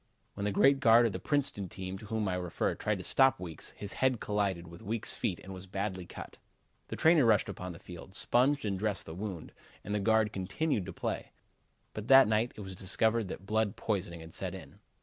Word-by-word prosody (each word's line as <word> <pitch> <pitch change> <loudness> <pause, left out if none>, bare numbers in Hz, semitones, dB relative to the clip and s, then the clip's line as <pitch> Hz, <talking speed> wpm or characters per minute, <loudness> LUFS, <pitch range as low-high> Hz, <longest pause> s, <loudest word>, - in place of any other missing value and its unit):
When 100 - -4
the 105 - +1
great 135 +7 +4
guard 120 -2 +6
of 115 - +1
the - - -4
Princeton 140 - 0
team 95 +1 -6
to 105 - -11
whom 110 -1 -1
I 95 - 0
refer 90 -2 -1
tried - - -1
to - - -7
stop 135 -5 +4
Weekes, 85 -3 -5
his 100 -1 -4
head 130 -3 +3
collided 100 -4 -1
with 85 +1 -12
Weekes' 110 +2 0
feet 90 - -2
and 95 - -9
was 95 0 -9
badly 95 -2 -3
cut. - - -10 0.5
The - - -5
trainer 160 -2 +5
rushed 110 -3 +4
upon 90 -2 -6
the - - -10
field, 90 +1 -11
sponged 135 +4 +2
and 100 -2 -1
dressed 105 -2 -1
the 80 - -8
wound 95 -2 -6 0.3
and 105 - -4
the 105 - +1
guard 110 +1 +2
continued 100 - -1
to - - -4
play. - - -4 0.6
But 110 +1 -6
that 135 -1 +8
night 110 +3 +1
it - - -8
was 95 -1 -7
discovered 110 +4 +1
that 95 - -7
blood 110 0 0
poisoning 90 -6 -3
had 80 0 -11
set - - -4
in. - - -12
100 Hz, 220 wpm, -31 LUFS, 95-115 Hz, 0.6 s, that